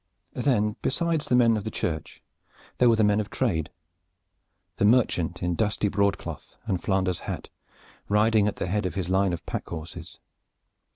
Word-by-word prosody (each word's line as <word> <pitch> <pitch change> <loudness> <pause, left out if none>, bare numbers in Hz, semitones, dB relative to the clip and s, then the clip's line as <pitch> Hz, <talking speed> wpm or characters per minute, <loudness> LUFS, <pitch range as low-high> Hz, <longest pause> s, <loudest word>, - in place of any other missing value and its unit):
Then 115 -5 +1
besides 160 +2 0
the 125 - +3
men 115 -2 +5
of 105 - -2
the 110 - -3
church 80 -7 -4 0.6
there 125 - +6
were 115 - +5
the 110 - +2
men 105 0 +3
of 105 - -3
trade, 80 - -1 1.1
the - - 0
merchant 100 -7 +2
in 90 0 +1
dusty 105 +1 0
broadcloth 100 0 -2
and 90 -2 -1
Flanders 95 -3 0
hat - - -5 0.6
riding 105 0 +4
at 105 - -1
the - - -3
head 95 +1 0
of 90 - -6
his 95 -3 -2
line 95 0 +2
of 85 - -5
pack - - -4
horses. 85 +2 -8
100 Hz, 170 wpm, -26 LUFS, 90-110 Hz, 1.1 s, there